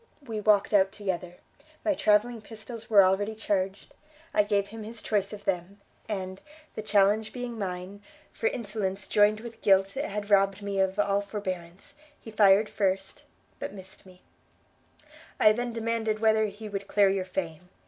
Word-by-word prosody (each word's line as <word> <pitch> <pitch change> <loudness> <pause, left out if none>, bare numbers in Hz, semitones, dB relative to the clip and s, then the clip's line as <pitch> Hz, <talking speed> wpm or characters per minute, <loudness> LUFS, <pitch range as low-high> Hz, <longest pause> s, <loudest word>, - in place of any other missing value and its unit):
we 225 -5 -4
walked 205 -1 +3
out 195 -1 +4
together; 185 -4 -4 0.5
my 315 - +3
travelling 220 -1 +2
pistols 225 +1 -9
were 205 -3 +7
already 200 +3 +1
charged; 195 -3 -2 0.4
I 210 - +5
gave 205 -1 0
him 225 +1 -8
his 220 +2 -7
choice 200 -3 -1
of 205 -1 -9
them, 190 +1 -2 0.3
and, 190 -2 -4 0.3
the - - -5
challenge 210 +1 +2
being 245 -2 -6
mine, 185 +1 -5 0.3
for 455 - -1
insolence 205 - -3
joined 210 +1 +3
with 235 -1 -10
guilt 195 -1 +4
had 210 -6 -4
robbed 195 0 +3
me 200 -1 -2
of 190 0 +1
all 200 -1 +2
forbearance, 190 -3 -6 0.3
he 225 - -11
fired 205 0 +5
first, 195 -1 -2 0.4
but - - -5
missed 190 -1 -11
me: 185 -1 -18 1.2
I 215 - +7
then 240 +2 -2
demanded 225 -1 -1
whether 220 0 +3
he 210 +2 -8
would 200 -1 -5
clear 200 -1 +4
your 195 -1 0
fame? 180 -2 -5
205 Hz, 160 wpm, -28 LUFS, 195-220 Hz, 1.2 s, were